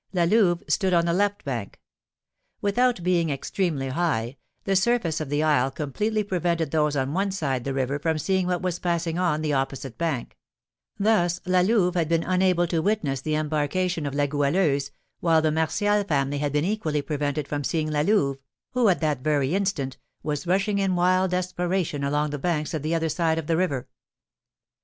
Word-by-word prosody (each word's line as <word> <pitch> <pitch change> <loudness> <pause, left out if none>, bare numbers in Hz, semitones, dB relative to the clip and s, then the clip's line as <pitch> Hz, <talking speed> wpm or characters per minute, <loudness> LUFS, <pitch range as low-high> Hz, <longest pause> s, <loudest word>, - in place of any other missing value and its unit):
La 175 -2 +2
Louve 175 -2 +3
stood 190 -4 +1
on 170 0 +3
the 170 - +1
left 205 +2 0
bank. 120 -7 -4 0.8
Without 235 0 +1
being 175 -2 +2
extremely 145 0 -2
high, 130 -5 -1 0.3
the 195 - 0
surface 190 -6 +1
of 150 - -4
the 145 +1 +1
isle 145 -4 +3
completely 210 +11 -2
prevented 170 -5 -1
those 150 -2 +1
on 135 +1 -1
one 195 +3 0
side 140 -10 -2
the 135 - -1
river 135 +2 -1
from 160 +1 0
seeing 190 +3 0
what 180 -1 -1
was 180 -2 -1
passing 170 -1 -1
on 160 -4 +1
the 150 -1 0
opposite 135 -1 -3
bank; 160 -8 -2 0.6
thus 195 -5 +2
La 185 0 +3
Louve 185 -2 +2
had 170 -3 0
been 165 0 +2
unable 185 -1 +2
to 170 -1 -1
witness 160 -10 0
the 155 +2 -1
embarkation 155 +2 -1
of 140 - -4
La 145 0 +2
Goualeuse, 145 0 +1 0.3
while 165 -2 +3
the 155 - +2
Martial 205 +7 +1
family 145 -5 0
had 145 0 -1
been 150 +2 +1
equally 165 -8 -1
prevented 145 0 -2
from 145 0 -3
seeing 155 +2 -1
La 150 -1 +1
Louve, 150 -7 +2 0.3
who, 245 -4 +3
at 180 - +1
that 150 -4 0
very 145 0 +1
instant, 185 -10 -1 0.3
was 150 +3 -3
rushing 200 +3 +1
in 190 -2 +1
wild 185 +1 +3
desperation 180 -4 -1
along 145 +1 0
the 145 - -4
banks 155 0 -1
of 155 - -2
the 155 +3 -1
other 165 0 0
side 160 0 0
of 165 - -3
the 165 - +1
river. 160 -8 -1
165 Hz, 190 wpm, -25 LUFS, 145-185 Hz, 0.8 s, Louve